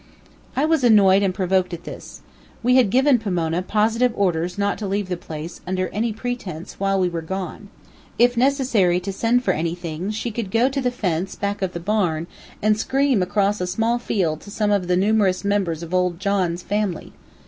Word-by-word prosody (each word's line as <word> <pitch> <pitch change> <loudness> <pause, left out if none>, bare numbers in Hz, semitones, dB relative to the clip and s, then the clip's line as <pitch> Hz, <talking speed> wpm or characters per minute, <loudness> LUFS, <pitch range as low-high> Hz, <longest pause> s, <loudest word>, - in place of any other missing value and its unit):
I 275 - +2
was 315 -3 +2
annoyed 200 -4 +6
and 195 -2 +2
provoked 185 -1 0
at 170 - -13
this. - - -10 0.4
We 250 +1 +4
had 250 -6 +5
given 260 +3 +4
Pomona 175 -5 -1
positive 225 +5 +1
orders 180 -2 0
not 200 0 0
to 210 - -3
leave 195 0 -2
the 180 - -1
place, 160 0 -8
under 185 0 -1
any 225 +3 -1
pretense, 215 -7 -6
while 195 0 +1
we 185 - +2
were 170 -1 -3
gone. 190 +3 -6 0.5
If 245 +1 +4
necessary 240 -9 +2
to 195 +2 -5
send 235 +5 +1
for 190 - +2
anything, 170 +1 -3
she 220 +2 -3
could 220 -2 -4
go 230 +6 +3
to 275 0 -2
the 250 - +1
fence, 190 -6 -2
back 200 0 -3
of 190 -1 -1
the 170 - -4
barn, 175 -4 0 0.4
and 215 0 +3
scream 270 -3 +2
across 200 +2 +1
a 180 - -1
small 225 +6 0
field 170 -9 -1
to - - -12
some 210 0 0
of 200 -3 +1
the 180 0 +2
numerous 200 -1 +2
members 190 -5 0
of 170 +1 -8
old 180 -2 +1
John's 185 -3 0
family. 205 -4 -2
195 Hz, 195 wpm, -22 LUFS, 180-225 Hz, 0.5 s, annoyed